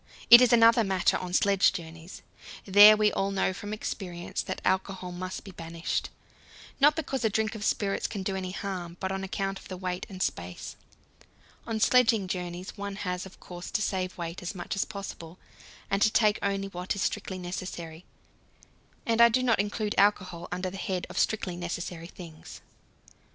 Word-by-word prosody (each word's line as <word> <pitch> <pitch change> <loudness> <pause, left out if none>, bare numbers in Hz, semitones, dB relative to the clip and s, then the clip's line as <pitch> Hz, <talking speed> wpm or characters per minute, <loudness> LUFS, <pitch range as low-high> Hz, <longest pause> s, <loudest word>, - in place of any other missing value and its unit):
It 240 +1 +12
is 250 - +5
another 230 0 +6
matter 190 -3 +2
on 180 -1 -4
sledge 195 +1 +3
journeys: 165 +1 -9 0.4
there 205 +2 +9
we 210 0 +3
all 195 - 0
know 195 -1 0
from 205 +2 -7
experience 180 -5 -4
that - - -5
alcohol 190 -1 -1
must 185 +1 -6
be 195 - -10
banished 165 -1 -4 0.7
not 295 +2 +6
because 275 -5 -3
a 220 - +3
drink 220 +2 0
of 215 -2 -6
spirits 200 -2 0
can 200 -3 -5
do 190 0 -2
any 185 -1 -3
harm, 180 -3 -5
but 190 -1 -2
on 195 0 -3
account 195 0 -3
of - - -14
the 185 - -6
weight 180 0 -4
and 185 -2 -3
space. 90 0 -4 0.9
On 225 -1 -2
sledging 225 -4 +4
journeys 180 0 -5
one 200 -1 -5
has, 180 -2 -4
of 190 - -17
course, 175 0 -9
to 230 - -1
save 185 -2 -2
weight 170 0 -5
as 180 +3 -5
much 175 +3 -4
as 195 - 0
possible, 195 -5 -8 0.5
and 195 0 0
to 215 - +6
take 215 -1 +3
only 195 0 -1
what 180 +1 -3
is 200 - -2
strictly 200 -3 -2
necessary; 175 -2 -6 1.0
and 230 0 +2
I 235 - +9
do 255 +3 +1
not 230 -5 +2
include 210 +1 -1
alcohol 185 -4 +1
under 180 +1 -3
the 195 - -7
head 185 -2 -3
of - - -3
strictly 195 -5 0
necessary 175 -1 -5
things. 165 -3 -11
190 Hz, 180 wpm, -28 LUFS, 180-210 Hz, 1.0 s, It